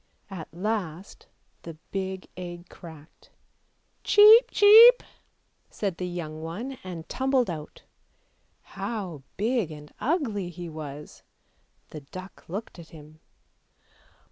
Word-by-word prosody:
At 165 -5 -8
last 185 -1 -5 0.3
the 165 -2 -9 0.2
big 190 -1 -4
egg 175 -1 -9
cracked. 160 -3 -14 0.7
"Cheep, 430 +4 +7
cheep!" 450 +4 +8 0.7
said 195 -5 -4
the 180 - -4
young 160 -3 -6
one 225 +12 -6
and 175 -3 -8
tumbled 260 -5 0
out; 155 -2 -9 0.8
how 185 - -6 0.2
big 220 -3 0
and 150 -1 -11
ugly 240 - -1
he 175 0 -8
was! 150 -2 -9 0.7
The 155 - -8
duck 185 +7 -11
looked 195 0 -7
at 165 - -12
him. 155 0 -15
180 Hz, 110 wpm, -26 LUFS, 160-225 Hz, 0.8 s, cheep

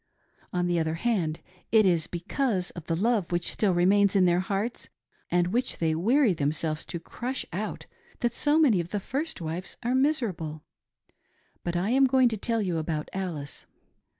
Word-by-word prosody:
On 180 -1 0
the 175 -1 +1
other 160 0 -1
hand, 170 -6 -1 0.3
it 220 -2 +6
is 170 -4 +2
because 185 +2 -1
of 170 -2 -10
the 165 - 0
love 210 -1 +1
which 175 0 0
still 205 -3 +1
remains 195 +3 +4
in 190 -2 +5
their 175 0 +3
hearts, 200 +5 -3 0.4
and 175 +1 +1
which 250 +2 0
they 160 -1 +1
weary 225 - +3
themselves 155 +1 -1
to 170 - -4
crush 250 +9 -4
out, 205 +4 -4 0.4
that 240 -2 +1
so 295 +4 +2
many 265 - +4
of 170 0 -3
the 205 - -2
first 275 - -4
wives 165 +3 -4
are 240 +2 0
miserable. 220 - 0 1.0
But 175 0 -2
I 190 +7 +1
was 270 - +6
going 260 -1 +5
to 220 - -3
tell 225 +1 0
you 175 -4 -1
about 155 -1 -3
Alice. 170 -7 -5
185 Hz, 175 wpm, -27 LUFS, 170-235 Hz, 1.0 s, it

